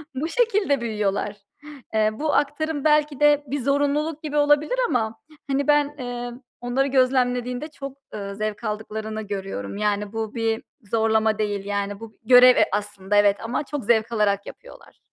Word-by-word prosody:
Bu 285 +5 -2
şekilde 390 - +1
büyüyorlar. 210 -2 -2 0.6
Eee, 215 0 +3
bu 300 +7 -2
aktarım 295 0 0
belki 300 -2 +2
de 295 -1 +4
bir 285 +3 -2
zorunluluk 290 +3 0
gibi 300 -1 -3
olabilir 295 +11 +3
ama, 225 -5 -1 0.3
hani, 275 0 0
ben, 295 0 +3
eee, 245 -1 -5 0.3
onları 255 +3 0
gözlemlediğinde 250 0 +1
çok, 275 -3 -9 0.2
eee, 200 -1 -5
zevk 215 +1 -4
aldıklarını 215 0 -4
görüyorum. 195 - -5
Yani 210 0 -1
bu 225 0 -4
bir 225 0 -1 0.3
zorlama 220 -1 +2
değil, 205 -2 -2
yani, 200 0 -3
bu 225 -1 -10
görev 250 +2 +8
e - - +5
aslında, 205 -1 -2
evet 205 -1 +4
ama 240 +5 -2
çok 290 -3 -5
zevk 225 0 +2
alarak 200 -3 +1
yapıyorlar. - - -13
240 Hz, 155 wpm, -23 LUFS, 210-285 Hz, 0.6 s, görev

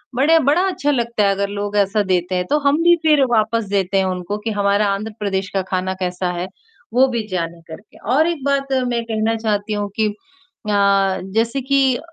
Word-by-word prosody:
बड़े 315 +5 +4
बड़ा 320 +5 +3
अच्छा 290 -5 -1
लगता 235 -5 0
है 200 - +3
अगर 200 0 -2
लोग 205 0 -3
ऐसा 205 +1 +2
देते 185 -1 0
हैं, 180 0 0
तो 295 - +4
हम 285 +3 +2
भी 345 0 +6
फिर 300 -3 +4
वापस 225 0 +1
देते 195 0 0
हैं 190 - +2
उनको 185 +2 -3
कि 225 - 0
हमारा 200 0 +1
आंध्र 215 +3 -4
प्रदेश 195 -2 -2
का 195 - +2
खाना 185 0 -1
कैसा 180 0 -2
है, 180 - -3 0.5
वो 260 +2 +5
भी 230 -3 -3
जाने 170 -3 -4
करके। 200 +6 -12 0.2
और 315 +3 +4
एक 310 -6 -4
बात 275 -1 0
मैं 235 -1 -1
कहना 225 0 0
चाहती 210 -1 -1
हूँ 205 0 -2
कि 215 - +3
अ, 370 - -13 0.7
जैसे 230 +4 +1
कि 265 -1 +2
215 Hz, 205 wpm, -19 LUFS, 195-270 Hz, 0.7 s, भी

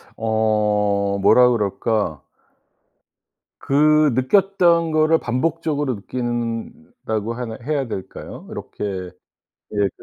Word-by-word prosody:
어 105 -2 +1
뭐라 125 +4 +6
그럴까 105 - -1 1.4
그 150 +2 +4
느꼈던 170 - +3
것을 155 +1 +3
반복적으로 145 +1 -1
느낀다고 120 - -4
하나 115 -2 -6
해야 140 -1 -1
될까요? 95 -4 -8
이렇게 95 -3 -5 0.6
이 105 -1 +1
120 Hz, 190 characters per minute, -21 LUFS, 105-155 Hz, 1.4 s, 뭐라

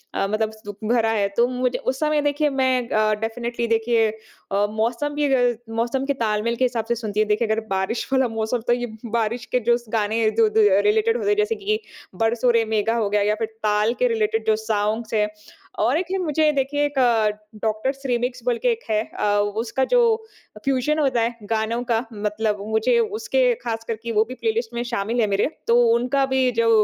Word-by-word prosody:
अ, 195 - 0
मतलब 215 +1 -1
दुःख 205 0 -7
भरा 225 -2 +3
है 205 -3 +1
तो 235 - +4
मुझे 250 0 -1
उस 260 +1 -2
समय 305 -1 +1
देखिए 290 +1 +1
मैं 260 -3 0
अ, 215 0 +2
डेफिनिटली 235 +1 -3
देखिए 225 0 +2
अ, 215 -2 -4
मौसम 235 +7 -1
भी 290 -2 +1
अग 245 -3 +2 0.2
मौसम 240 +4 -1
के 280 - 0
ताल-मेल 215 +2 0
के 255 - +1
हिसाब 235 -3 -2
से 235 +1 0
सुनती 215 -2 -3
हूँ। 215 - +3
देखिए 220 +2 +1
अगर 220 +1 +1
बारिश 190 +4 -1
वाला 260 -1 +3
मौसम 225 +2 -1
तो 240 - +4
ये 245 0 -2 0.3
बारिश 230 +1 -1
के 250 - +4
जोस 240 0 +1
गाने 220 +1 +1
जो 220 0 +3
दो 220 +1 +3 0.2
रिलेटेड 445 +2 +2
होते 420 -3 -1
हैं 415 - +2
जैसे 425 +2 +1
कि 430 +2 +1 0.5
बरसो 235 +2 +2
रे 230 -1 +2
मेघा 225 +2 +1
हो 215 -3 0
गया 205 0 +1
या 210 +1 +1
फिर 225 - -1 0.2
ताल 210 +2 +2
के - - +3
रिलेटेड 445 +1 -1
जो 220 - +4
सॉन्ग्स 215 +1 -1
हैं। 210 -1 +2 0.5
और 240 +7 +2
एक 360 - -1
है 385 - 0
मुझे 310 -3 +2
देखिए 290 +1 0
एक 290 -1 -5 0.7
डॉक्टर्स 245 +6 -1
रीमिक्स 245 0 -1
बोल 240 -1 +1
के - - +5
एक 460 - -2
है 215 0 +2 0.2
अ, - - 0 0.4
उसका 265 +3 -1
जो - - +6 0.6
अ, - - -10
फ्यूजन 275 +3 +1
होता 260 -5 +2
है 235 +1 -1 0.2
गानों 225 +2 0
का 230 +2 +1
मतलब 210 0 -1
मुझे 220 - +2
उसके 465 +3 +1
ख़ास 225 -1 -3
करके 230 +1 -4
वो 215 0 +4
भी 255 - -5
प्लेलिस्ट 450 - -2
में 240 - -1
शामिल 235 0 -1
है 215 - +2
मेरे, 200 0 +1 0.2
तो 235 +1 +5 0.2
उनका 260 +3 +1
भी 265 -1 +1
जो 230 -1 +1
235 Hz, 210 wpm, -22 LUFS, 220-270 Hz, 0.7 s, जो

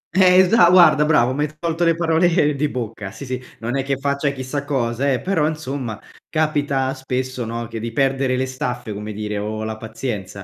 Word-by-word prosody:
Eh, 185 -1 +6
esa 185 -2 +5
guarda 175 -4 +6
bravo, 130 -5 +3
mi 145 - -2
hai - - -6
tolto 170 0 -1
le 165 -1 +3
parole 165 -2 +2
di 145 +2 0
bocca. 115 -6 -5
Sì, 140 - -9
sì. 130 0 -4 0.2
Non 120 +3 -3
è - - +1
che 135 0 -1
faccia 140 +1 0
chissà 140 +1 -4
cosa, 135 -1 0
eh, 130 - +1
però, 175 -6 +1
insomma, 135 -7 -4 0.3
capita 145 -4 0
spesso, 130 -2 -3
no, 115 0 -4
che 115 0 -6
di 115 +1 -4
perdere 135 0 +1
le 130 - 0
staffe, 125 -4 -4
come 105 +1 -6
dire, 105 0 -4
o 110 +1 -4
la 110 0 -3
pazienza. 105 -4 -5
135 Hz, 200 wpm, -21 LUFS, 115-150 Hz, 0.3 s, Eh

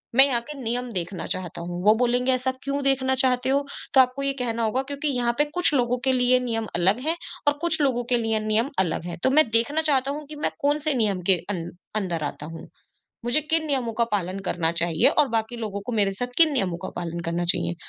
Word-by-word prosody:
मैं 270 +2 +9
यहाँ 255 -4 +1
के - - -4
नियम 245 +1 -2
देखना 180 0 -4
चाहता 180 -2 -7
हूँ, 175 +1 -5
वो 210 - +7
बोलेंगे 250 +1 +2
ऐसा 255 0 +1
क्यों 280 +1 -2
देखना 265 -1 +1
चाहते 255 0 +1
हो, 280 +1 +1 0.3
तो 265 - +8
आपको 255 +2 -1
ये 275 0 0
कहना 230 -1 -1
होगा 225 +4 0
क्योंकि 285 +2 -2
यहाँ 245 -4 +1
पे 295 - +3
कुछ 355 -4 +1
लोगों 250 -2 +1
के 265 - +4
लिए 250 0 +3
नियम 225 -3 -3
अलग 190 +7 +2
हैं 325 - +2 0.3
और 290 0 +3
कुछ 335 -2 0
लोगों 255 -4 +1
के 245 - +4
लिए 225 -1 0
नियम 220 +5 +2
अलग 170 -2 0
हैं, 175 - -5
तो - - +4
मैं 305 0 +5
देखना 235 +8 +3
चाहता 275 -3 +1
हूँ 300 +1 -6
कि 305 - -8
मैं - - +1
कौन-से 295 +1 +1
नियम 210 -7 0
के 185 - +7
अन 175 -4 -3 0.3
अंदर 175 -6 -2
आता 145 0 -5
हूँ। 165 - -9 0.6
मुझे 240 +6 +2
किन 320 +2 +3
नियमों 260 -6 -1
का 235 - +4
पालन 190 -2 -2
करना 170 -3 0
चाहिए 170 -2 +3
और 295 -2 +5
बाकी 225 +1 -2
लोगों 210 -3 -4
को 245 - -3
मेरे 205 -3 +2
साथ 245 +4 -5
किन 325 -2 +6
नियमों 195 -10 0
का - - -3
पालन 170 -1 -4
करना 170 +1 -1
चाहिए, 175 -1 -2
245 Hz, 235 wpm, -24 LUFS, 195-275 Hz, 0.6 s, मैं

